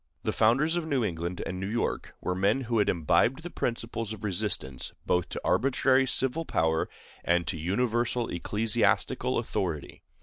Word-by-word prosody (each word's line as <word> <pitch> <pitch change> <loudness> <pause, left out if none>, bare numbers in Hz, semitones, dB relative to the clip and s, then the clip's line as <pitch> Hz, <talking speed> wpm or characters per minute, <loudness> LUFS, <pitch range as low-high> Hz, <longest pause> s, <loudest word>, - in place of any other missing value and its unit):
The - - 0
founders 135 +9 +3
of 165 -2 -2
New 135 -7 +1
England 85 -1 -3
and 90 - -4
New 95 +1 -3
York 115 +2 -2
were 90 - -1
men 100 +8 +2
who 115 -2 0
had 105 - +3
imbibed 115 - +2
the 175 - -6
principles 115 -2 -3
of 110 -1 -10
resistance 65 - -2
both 90 -1 +1
to - - -5
arbitrary 130 0 +3
civil 135 +5 +1
power 80 - 0 0.3
and 85 0 +2
to 95 - -1
universal 120 +6 0
ecclesiastical 105 +5 +1
authority. 80 -6 -3
110 Hz, 160 wpm, -28 LUFS, 90-125 Hz, 0.3 s, founders